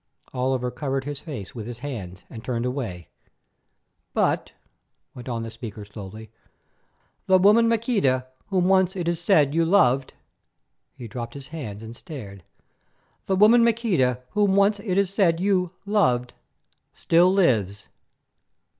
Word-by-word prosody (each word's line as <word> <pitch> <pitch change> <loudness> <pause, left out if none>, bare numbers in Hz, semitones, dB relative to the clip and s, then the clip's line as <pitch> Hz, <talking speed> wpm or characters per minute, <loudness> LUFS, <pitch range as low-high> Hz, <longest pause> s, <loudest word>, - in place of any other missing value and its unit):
Oliver 125 -1 -1
covered 135 +2 -3
his 145 0 -5
face 135 - -8
with 115 -3 -7
his 120 -1 -7
hands 105 -9 -7
and 110 -3 -10
turned 120 -1 -2
away. 115 - -4 1.1
"But," - - 0 0.6
went 125 0 -9
on 115 -2 -3
the 115 - -6
speaker 110 -3 -8
slowly, 105 +1 -10 1.0
"the 190 - +6
woman 210 +5 +5
Maqueda 210 - +1 0.2
whom 185 -3 +1
once 190 -1 +3
it 175 -3 -3
is 170 -1 -1
said 155 -7 +3
you 165 +1 +2
loved——" 140 -8 +2 0.8
He 120 - -8
dropped 120 +2 -7
his 140 0 -10
hands 115 -10 -7
and 115 +1 -9
stared. 105 - -10 0.8
"——the 190 - +2
woman 220 +5 +6
Maqueda 185 - +1
whom 205 -2 +2
once 200 +1 +3
it 195 -3 -2
is 200 -2 +2
said 170 -5 +2
you—loved—still 180 - 0
lives." 110 - +1
140 Hz, 135 wpm, -24 LUFS, 120-190 Hz, 1.1 s, the